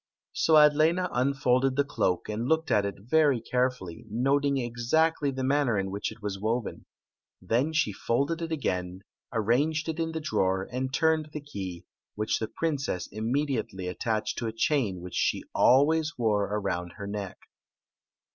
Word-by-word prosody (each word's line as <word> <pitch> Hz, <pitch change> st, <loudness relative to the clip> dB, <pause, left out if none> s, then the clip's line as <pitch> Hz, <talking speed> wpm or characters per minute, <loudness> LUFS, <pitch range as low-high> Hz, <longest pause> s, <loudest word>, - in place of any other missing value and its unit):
So 160 Hz, -, +3 dB
Adlena 155 Hz, +4 st, +5 dB
unfolded 130 Hz, 0 st, +2 dB
the 140 Hz, -, +3 dB
cloak 95 Hz, -10 st, -1 dB
and 110 Hz, +3 st, -3 dB
looked 160 Hz, +2 st, +1 dB
at 100 Hz, -1 st, +3 dB
it 100 Hz, -, -5 dB
very 140 Hz, +2 st, +3 dB
carefully, 125 Hz, -7 st, -2 dB
noting 140 Hz, +5 st, +1 dB
exactly 135 Hz, +6 st, +1 dB
the 130 Hz, -1 st, -3 dB
manner 135 Hz, -4 st, +2 dB
in 95 Hz, 0 st, -2 dB
which 100 Hz, +1 st, -3 dB
it 110 Hz, -, -14 dB
waft 100 Hz, -2 st, -3 dB
woven. 115 Hz, +2 st, -2 dB, 0.5 s
Then 125 Hz, +7 st, 0 dB
she 160 Hz, -10 st, +1 dB
folded 140 Hz, -, -1 dB
it 165 Hz, 0 st, -4 dB
again, 90 Hz, -, -2 dB, 0.3 s
ananged 135 Hz, +9 st, +1 dB
it 160 Hz, 0 st, -3 dB
in 165 Hz, 0 st, -1 dB
the 160 Hz, -, -2 dB
drawer, 95 Hz, -9 st, 0 dB
and 130 Hz, +1 st, -2 dB
turned 160 Hz, +1 st, +1 dB
the 150 Hz, -, -3 dB
key, 95 Hz, -, -7 dB, 0.3 s
which 105 Hz, +1 st, 0 dB
the 110 Hz, -, -2 dB
princess 145 Hz, -, -2 dB
imme 120 Hz, +8 st, -1 dB
diatdy 105 Hz, -8 st, -3 dB
attached 110 Hz, +4 st, -2 dB
to 115 Hz, -, -2 dB
a -, -, -2 dB
chain 115 Hz, -, 0 dB
which 90 Hz, 0 st, -9 dB
she -, -, 0 dB
always 155 Hz, +5 st, +4 dB
wore 105 Hz, -4 st, +1 dB
around 95 Hz, -4 st, -3 dB
her 100 Hz, -, -7 dB
neck. 100 Hz, -2 st, -5 dB
125 Hz, 165 wpm, -28 LUFS, 105-150 Hz, 0.5 s, Adlena